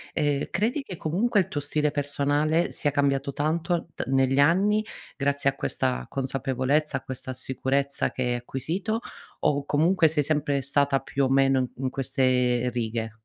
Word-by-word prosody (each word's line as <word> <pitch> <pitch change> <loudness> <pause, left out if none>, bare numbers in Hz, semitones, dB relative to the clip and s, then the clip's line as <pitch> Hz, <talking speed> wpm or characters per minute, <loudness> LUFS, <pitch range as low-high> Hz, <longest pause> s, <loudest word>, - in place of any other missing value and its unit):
uhm, 145 -2 0
credi 225 - 0
che 185 -10 -8
comunque 200 +7 +1
il - - -4
tuo 145 - -3
stile 150 +1 0
personale 145 +3 0
sia 145 - 0
cambiato 140 -1 0
tanto 170 +3 -1
t - - -5
negli 135 0 +2
anni 200 +8 +4 0.3
grazie 140 0 +1
a - - -17
questa 60 - -2
consapevolezza, 135 +2 0
a - - -8
questa 130 0 -6
sicurezza 135 +2 -1
che 130 - -3
hai 125 - 0
acquisito, 160 - -3 0.4
o 140 -1 +1
comunque 165 +4 +3
sei 150 -1 +1
sempre 145 -2 0
stata 140 0 +2
più 140 0 -1
o - - 0
meno, 135 0 +4
mhmm, 125 - -1 0.2
in 130 - +1
queste 125 -2 +1
righe? 115 -1 -3
140 Hz, 165 wpm, -26 LUFS, 130-155 Hz, 0.4 s, anni